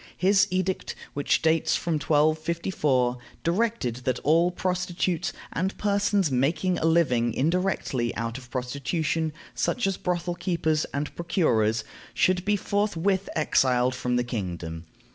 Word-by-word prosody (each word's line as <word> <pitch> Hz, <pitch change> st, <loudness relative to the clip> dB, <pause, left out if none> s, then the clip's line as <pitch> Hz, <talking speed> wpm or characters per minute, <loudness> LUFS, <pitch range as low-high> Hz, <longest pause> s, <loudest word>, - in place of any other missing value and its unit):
His 195 Hz, +1 st, +4 dB
edict, 185 Hz, 0 st, -1 dB, 0.2 s
which 145 Hz, +3 st, +1 dB
dates 160 Hz, 0 st, +3 dB
from 170 Hz, -, -1 dB
1254, 155 Hz, -4 st, +1 dB, 0.2 s
directed 175 Hz, -, 0 dB
that 125 Hz, 0 st, -1 dB
all 165 Hz, +4 st, +4 dB
prostitutes, 180 Hz, -1 st, -1 dB, 0.2 s
and 190 Hz, +3 st, -1 dB
persons 200 Hz, -4 st, +1 dB
making 155 Hz, +8 st, +1 dB
a -, -, -1 dB
living 125 Hz, -9 st, +2 dB
indirectly 150 Hz, -6 st, 0 dB
out 115 Hz, +2 st, -3 dB
of 125 Hz, -2 st, -15 dB
prostitution, 140 Hz, +5 st, -1 dB, 0.2 s
such 245 Hz, -, 0 dB
as 195 Hz, -1 st, 0 dB
brothel 175 Hz, -1 st, -1 dB
keepers 160 Hz, -4 st, 0 dB
and 145 Hz, +1 st, -3 dB
procurers, 115 Hz, -, +1 dB, 0.3 s
should 185 Hz, -1 st, +2 dB
be 205 Hz, 0 st, +3 dB
forthwith 200 Hz, -1 st, 0 dB
exiled 130 Hz, -4 st, +2 dB
from 125 Hz, -1 st, -1 dB
the 125 Hz, -, +2 dB
kingdom. 85 Hz, -8 st, -5 dB
160 Hz, 125 wpm, -26 LUFS, 125-185 Hz, 0.3 s, His